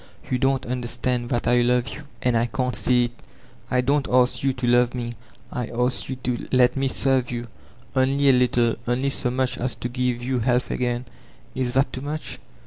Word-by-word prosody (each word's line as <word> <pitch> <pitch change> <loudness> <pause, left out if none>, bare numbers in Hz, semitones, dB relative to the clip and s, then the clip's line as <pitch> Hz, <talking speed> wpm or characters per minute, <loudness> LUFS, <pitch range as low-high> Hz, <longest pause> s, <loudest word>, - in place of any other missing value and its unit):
You 125 - +1
don't 135 0 +1
understand 120 0 -1
that 120 - -1
I 120 0 +4
love 125 0 +3
jrou, 120 +5 -8 0.2
and 125 -1 +2
I 115 +1 +2
can't 125 +1 -1
see 125 +2 +3
it? 120 - -5 0.6
I 125 - +2
don't 140 +2 +1
ask 125 0 +3
you 135 - +2
to 130 -1 -4
love 120 0 +3
me; 120 -1 -3 0.4
I 125 -2 -3
adc 125 +1 0
jrou 125 - -24
to 125 -1 -2
let 125 -1 +4
me 135 0 +1
serve 130 -2 +1
you. 120 0 -4 0.5
Only 135 +2 +2
a 135 - +7
little, 120 -2 +2
only 130 +3 +1
so 135 -2 0
much 130 0 -1
as 125 +1 -2
to 120 - -4
give 125 -1 -1
you 130 0 0
health 125 +2 +1
again; 120 0 -1 0.5
is 125 -2 -1
that 135 0 +2
too 130 - -5
much? 150 +2 -5
125 Hz, 205 wpm, -24 LUFS, 120-130 Hz, 0.6 s, a